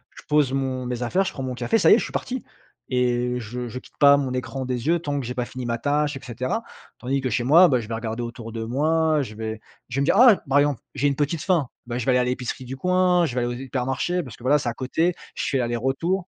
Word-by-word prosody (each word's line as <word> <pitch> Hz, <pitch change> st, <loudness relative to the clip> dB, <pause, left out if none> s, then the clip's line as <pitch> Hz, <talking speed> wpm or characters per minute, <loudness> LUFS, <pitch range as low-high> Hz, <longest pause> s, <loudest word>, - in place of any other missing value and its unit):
je -, -, -11 dB
pose 150 Hz, -3 st, +3 dB
mon 130 Hz, -2 st, -2 dB
mes 125 Hz, -1 st, -3 dB
affaires, 185 Hz, +11 st, +1 dB
je -, -, -3 dB
prends 135 Hz, -, -5 dB
mon 130 Hz, -1 st, -3 dB
café, 225 Hz, -, +1 dB
ça -, -, +5 dB
y -, -, +8 dB
je -, -, -1 dB
suis -, -, -6 dB
parti 255 Hz, -1 st, -3 dB, 0.5 s
et 125 Hz, -1 st, +2 dB, 0.2 s
heu, 125 Hz, -, -2 dB
je 120 Hz, +2 st, -5 dB
je 120 Hz, +2 st, -6 dB
quitte -, -, -20 dB
pas 140 Hz, -1 st, +7 dB
mon 140 Hz, -2 st, -1 dB
écran 130 Hz, +1 st, -3 dB
des 125 Hz, +1 st, -3 dB
yeux 170 Hz, +1 st, +3 dB
tant 145 Hz, -3 st, -2 dB
que 130 Hz, -, -4 dB
j'ai 125 Hz, -, -4 dB
pas 125 Hz, -1 st, -2 dB
fini 125 Hz, +1 st, -7 dB
ma 115 Hz, 0 st, -1 dB
tâche 145 Hz, +1 st, 0 dB
et 135 Hz, -, -6 dB
cetera. 130 Hz, -, -3 dB, 0.4 s
Tandis 135 Hz, +2 st, -1 dB
que 130 Hz, -, -2 dB
chez 120 Hz, +3 st, 0 dB
moi, 165 Hz, +8 st, +7 dB
bah, 130 Hz, -6 st, +2 dB
je 110 Hz, -, -9 dB
vais 115 Hz, -, -5 dB
regarder 115 Hz, +1 st, -4 dB
autour 115 Hz, -1 st, -7 dB
de 115 Hz, 0 st, -4 dB
moi, 155 Hz, +6 st, +1 dB
heu, -, -, +1 dB
je 110 Hz, -, -8 dB
vais 110 Hz, 0 st, -5 dB, 0.3 s
je 125 Hz, -, -5 dB
vais -, -, +2 dB
me -, -, +2 dB
dire: -, -, +3 dB
«Ah!» 240 Hz, -4 st, +8 dB
par 140 Hz, +1 st, +5 dB
exemple: 145 Hz, -3 st, +1 dB
«J'ai 145 Hz, +1 st, +1 dB
une 140 Hz, -, +1 dB
petite 145 Hz, +3 st, -1 dB
faim», 170 Hz, -7 st, +1 dB, 0.2 s
bah, 120 Hz, 0 st, -3 dB
je 120 Hz, -, -3 dB
vais 130 Hz, -, +3 dB
aller 125 Hz, -, +4 dB
à -, -, +3 dB
l'épicerie 125 Hz, 0 st, -3 dB
du 130 Hz, +2 st, -6 dB
coin, 180 Hz, +1 st, +3 dB
je 140 Hz, -, -3 dB
vais 125 Hz, -, +1 dB
aller 120 Hz, -, -1 dB
aux -, -, -6 dB
hypermarchés, 135 Hz, +7 st, -2 dB
parce 120 Hz, -5 st, -10 dB
que -, -, -16 dB
voilà, 145 Hz, +4 st, +4 dB
c'est 120 Hz, -, -2 dB
à -, -, -3 dB
côté, 160 Hz, +8 st, 0 dB, 0.2 s
je -, -, -3 dB
fais 135 Hz, -, +1 dB
l'aller-retour. 135 Hz, +10 st, -1 dB
130 Hz, 295 wpm, -24 LUFS, 125-150 Hz, 0.5 s, y